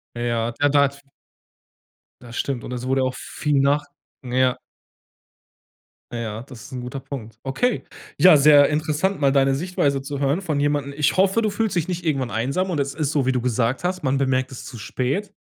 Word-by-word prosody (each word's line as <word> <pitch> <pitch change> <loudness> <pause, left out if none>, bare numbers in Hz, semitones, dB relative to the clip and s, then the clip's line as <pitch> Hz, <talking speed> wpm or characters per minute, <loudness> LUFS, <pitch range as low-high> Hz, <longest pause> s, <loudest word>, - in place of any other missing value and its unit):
Ja. 120 -1 -1
Ja, 145 0 +4
daz 140 -1 +2 1.2
Das 120 -1 -11
stimmt. 135 -4 -2
Und 125 - -6
es 125 0 -5
wurde 135 0 +2
auch 130 0 -1
viel 150 -2 -1
nach 145 +1 +2 0.4
ja. 125 0 +1 1.5
Ja, 115 -2 -4
das 125 -2 -12
ist 145 - -12
'n 125 - -4
guter 125 +2 -6
Punkt. 130 -4 -8
Okay. 230 - 0 0.3
Ja, 160 +1 +8
sehr 145 0 +7
interessant, 155 +5 0
mal 135 -1 +4
da 135 -1 +4
'ne 135 - +2
Sichtweise 140 -3 0
zu 140 0 -5
hören 145 +7 +1
von 155 -6 -1
jemandem. 145 -1 0
Ich 150 +4 +2
hoffe, 195 +4 +3
du 215 - +1
fühlst 220 -1 -1
dich 170 -1 0
nicht 180 -1 -3
irgendwann 135 -6 -1
einsam 140 +12 -1
und 155 - -1
es 140 0 -2
ist 155 -2 -1
so, 140 -4 0
wie - - +4
du 125 -2 -1
gesagt 125 +3 0
hast, 185 +1 -1
man 135 0 +1
bemerkt 130 -1 0
es 130 - -9
zu 120 -4 -9
spät. 140 - -2
140 Hz, 200 wpm, -22 LUFS, 130-155 Hz, 1.5 s, Ja